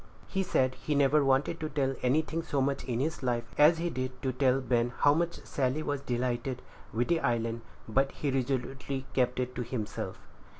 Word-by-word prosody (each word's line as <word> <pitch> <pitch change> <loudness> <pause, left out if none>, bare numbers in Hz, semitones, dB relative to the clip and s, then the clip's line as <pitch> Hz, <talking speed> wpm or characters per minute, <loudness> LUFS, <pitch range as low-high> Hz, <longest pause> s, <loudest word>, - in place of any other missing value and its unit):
He 195 - -1
said 130 -8 +2
he 150 - -1
never 145 +1 +4
wanted 135 +5 +2
to 155 - -3
tell 135 -2 0
anything 155 +5 +1
so 145 -4 -2
much 135 0 0
in 120 -2 -1
his 155 +4 -1
life, 120 -2 0
as 150 +3 +6
he 170 +1 -1
did 130 -1 -4
to 130 - +1
tell 130 0 +3
Ben 120 -2 +1
how 145 - +6
much 170 +2 0
Sally 135 +3 0
was 145 -2 -2
delighted 125 0 -2 0.3
with 120 +4 0
the 170 -1 +2
island; 115 -3 0 0.3
but 135 +5 +2
he 145 - -2
resolutely 135 +1 -2
kept 125 -1 +1
it 125 0 -2
to 125 - -3
himself. 115 -3 -4
135 Hz, 195 wpm, -30 LUFS, 125-145 Hz, 0.3 s, as